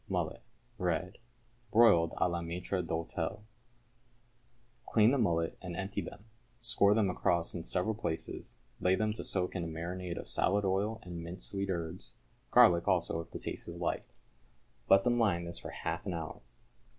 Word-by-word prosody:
=Mullet, -, -, -2 dB, 0.4 s
Red= 90 Hz, +1 st, -1 dB, 0.5 s
(Broiled 100 Hz, -8 st, +6 dB
à -, -, +2 dB
la 85 Hz, -1 st, -2 dB
maître 90 Hz, +3 st, -2 dB
d'hôtel). 85 Hz, +4 st, -3 dB, 1.5 s
Clean 110 Hz, +1 st, +6 dB
the 140 Hz, -, +2 dB
mullet 85 Hz, -7 st, +1 dB
and 90 Hz, -2 st, -6 dB
empty 95 Hz, +1 st, -2 dB
them, 100 Hz, -, -9 dB, 0.3 s
score 110 Hz, -4 st, +3 dB
them 110 Hz, -3 st, +3 dB
across 85 Hz, -2 st, +1 dB
in 85 Hz, -, -4 dB
several 90 Hz, +6 st, +1 dB
places, 80 Hz, -7 st, -4 dB, 0.2 s
lay 90 Hz, +1 st, +3 dB
them 110 Hz, +2 st, 0 dB
to -, -, -5 dB
soak 90 Hz, -1 st, -1 dB
in 90 Hz, -, -1 dB
a -, -, -3 dB
marinade 85 Hz, +2 st, -4 dB
of -, -, -6 dB
salad 100 Hz, +1 st, +2 dB
oil 100 Hz, +4 st, 0 dB
and 85 Hz, -2 st, -6 dB
minced 85 Hz, +2 st, -5 dB
sweet 100 Hz, 0 st, -2 dB
herbs 85 Hz, -7 st, -4 dB, 0.3 s
garlic 85 Hz, -1 st, +6 dB
also 85 Hz, -2 st, +2 dB
if 85 Hz, -, -12 dB
the -, -, -6 dB
taste -, -, -5 dB
is -, -, -7 dB
liked. -, -, -2 dB, 0.8 s
Let 95 Hz, 0 st, +7 dB
them 120 Hz, 0 st, +2 dB
lie 105 Hz, -6 st, +4 dB
in 85 Hz, 0 st, -5 dB
this 85 Hz, 0 st, -4 dB
for -, -, -7 dB
half -, -, -4 dB
an 90 Hz, -, -1 dB
hour. 80 Hz, -1 st, -6 dB
90 Hz, 175 wpm, -32 LUFS, 85-100 Hz, 1.5 s, Let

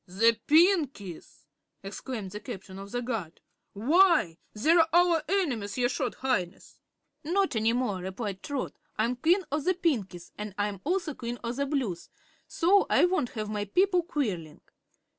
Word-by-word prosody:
"The 225 Hz, +5 st, +3 dB
Pinkies!" 300 Hz, -, +2 dB, 0.4 s
exclaimed 200 Hz, 0 st, -6 dB
the 210 Hz, -, -6 dB
Captain 190 Hz, -2 st, -8 dB
of 195 Hz, 0 st, -9 dB
the 245 Hz, +3 st, -3 dB
Guards; 220 Hz, -9 st, -4 dB, 0.3 s
"why, 265 Hz, -, +3 dB
they're 320 Hz, +10 st, +4 dB
our 345 Hz, -2 st, +4 dB
enemies, 260 Hz, -, -1 dB
your 245 Hz, -1 st, +2 dB
Short 255 Hz, -1 st, -2 dB
Highness." 185 Hz, -10 st, -3 dB, 0.4 s
"Not 370 Hz, +1 st, +1 dB
any 220 Hz, +1 st, +2 dB
more," 240 Hz, -6 st, -1 dB
replied 190 Hz, +1 st, -5 dB
Trot. 285 Hz, -3 st, -4 dB, 0.2 s
"I'm 230 Hz, +3 st, +1 dB
Queen 350 Hz, +9 st, +3 dB
of 295 Hz, 0 st, -1 dB
the 370 Hz, +3 st, +2 dB
Pinkies, 210 Hz, -, -2 dB
an' 210 Hz, -2 st, -6 dB
I'm 205 Hz, -2 st, -2 dB
also 350 Hz, -1 st, 0 dB
Queen 240 Hz, -1 st, -5 dB
of 235 Hz, +1 st, -3 dB
the 280 Hz, 0 st, 0 dB
Blues, 250 Hz, -, -2 dB, 0.4 s
so 390 Hz, +4 st, +3 dB
I -, -, +5 dB
won't 355 Hz, -9 st, 0 dB
have 215 Hz, -1 st, -2 dB
my 210 Hz, -1 st, -3 dB
people 360 Hz, -, +2 dB
quarreling. 205 Hz, -, -3 dB
245 Hz, 155 wpm, -28 LUFS, 200-325 Hz, 0.4 s, I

